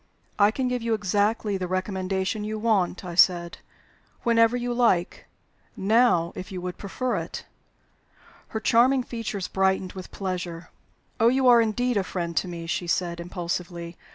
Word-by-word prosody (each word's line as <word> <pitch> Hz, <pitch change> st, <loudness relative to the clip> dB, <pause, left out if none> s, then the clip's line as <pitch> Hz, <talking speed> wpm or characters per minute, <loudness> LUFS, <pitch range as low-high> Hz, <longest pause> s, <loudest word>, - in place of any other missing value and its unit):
"I 205 Hz, 0 st, +6 dB
can 255 Hz, +4 st, -1 dB
give 250 Hz, -1 st, -1 dB
you 230 Hz, -1 st, +1 dB
exactly 205 Hz, 0 st, 0 dB
the 185 Hz, -1 st, -3 dB
recommendation 190 Hz, +2 st, -2 dB
you 215 Hz, +1 st, -3 dB
want," 205 Hz, -5 st, 0 dB
I 175 Hz, -, -5 dB
said, 170 Hz, -1 st, +3 dB, 0.6 s
"whenever 230 Hz, 0 st, +4 dB
you 245 Hz, 0 st, -2 dB
like. 230 Hz, -8 st, +1 dB, 0.5 s
Now, 200 Hz, -4 st, +3 dB
if 185 Hz, -, -7 dB
you 185 Hz, -, -4 dB
would 180 Hz, 0 st, -6 dB
prefer 245 Hz, +6 st, -2 dB
it." -, -, -6 dB, 1.0 s
Her 220 Hz, -, -4 dB
charming 250 Hz, +4 st, +4 dB
features 225 Hz, -6 st, -4 dB
brightened 190 Hz, -1 st, 0 dB
with 185 Hz, -2 st, -8 dB
pleasure. 180 Hz, -3 st, -5 dB, 0.5 s
"Oh, 225 Hz, -, +5 dB
you 260 Hz, +2 st, +3 dB
are 240 Hz, -1 st, +7 dB
indeed 235 Hz, +2 st, 0 dB
a 200 Hz, -, +2 dB
friend 170 Hz, -2 st, -4 dB
to -, -, +1 dB
me!" 170 Hz, -1 st, -6 dB
she 175 Hz, +1 st, -2 dB
said, 170 Hz, 0 st, -1 dB
impulsively. 170 Hz, -1 st, -5 dB
195 Hz, 155 wpm, -25 LUFS, 180-230 Hz, 1.0 s, are